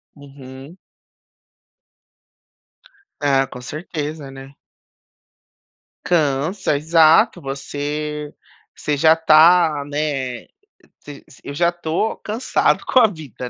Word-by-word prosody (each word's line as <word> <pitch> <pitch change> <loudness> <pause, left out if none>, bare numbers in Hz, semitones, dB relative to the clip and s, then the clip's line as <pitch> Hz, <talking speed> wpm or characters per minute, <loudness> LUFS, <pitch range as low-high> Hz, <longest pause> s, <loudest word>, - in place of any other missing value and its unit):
Uhum. 140 +2 -13 2.4
Ah, 135 -2 +1
com 125 - -11
certeza, 150 0 -6
né. 135 0 -12 1.5
Cansa, 155 +2 0
exato 160 +1 +3
você 145 +2 -5 0.4
você 150 - -2
já 160 +2 +5
está 160 -1 +4
né 145 -4 -4 0.6
se 145 -1 -11 0.2
eu 140 - -7
já 170 +3 +2
tô 175 +5 -3
cansado 220 +4 -1
com 260 - +3
a 235 - +6
vida, 145 - -9
150 Hz, 90 wpm, -19 LUFS, 140-160 Hz, 2.4 s, a